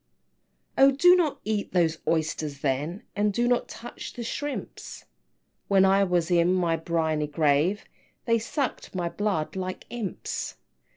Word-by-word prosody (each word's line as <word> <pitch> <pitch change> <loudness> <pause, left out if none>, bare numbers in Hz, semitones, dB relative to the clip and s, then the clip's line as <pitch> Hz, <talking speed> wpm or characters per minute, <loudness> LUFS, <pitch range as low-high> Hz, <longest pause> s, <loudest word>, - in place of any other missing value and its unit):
XII. - - +7
"Oh, 275 - +9
do 355 +7 +6
not 335 -5 +1
eat 210 -1 -2
those 165 -3 +2
oysters 155 -3 -1
then, 150 +7 -2
And 210 0 +2
do 240 +4 0
not 245 0 +1
touch 240 +1 -8
the 240 - -6
shrimps; 290 +4 -6 0.6
When 195 -1 +5
I 195 +1 +4
was 175 -2 0
in 170 0 +4
my 175 -3 +1
briny 160 -2 -1
grave, 150 +6 +1 0.4
They 230 -1 +3
sucked 250 -1 -3
my 175 -2 -1
blood 195 -5 -2
like 185 0 -5
imps!" 225 -7 -4
185 Hz, 150 wpm, -26 LUFS, 160-225 Hz, 0.6 s, Oh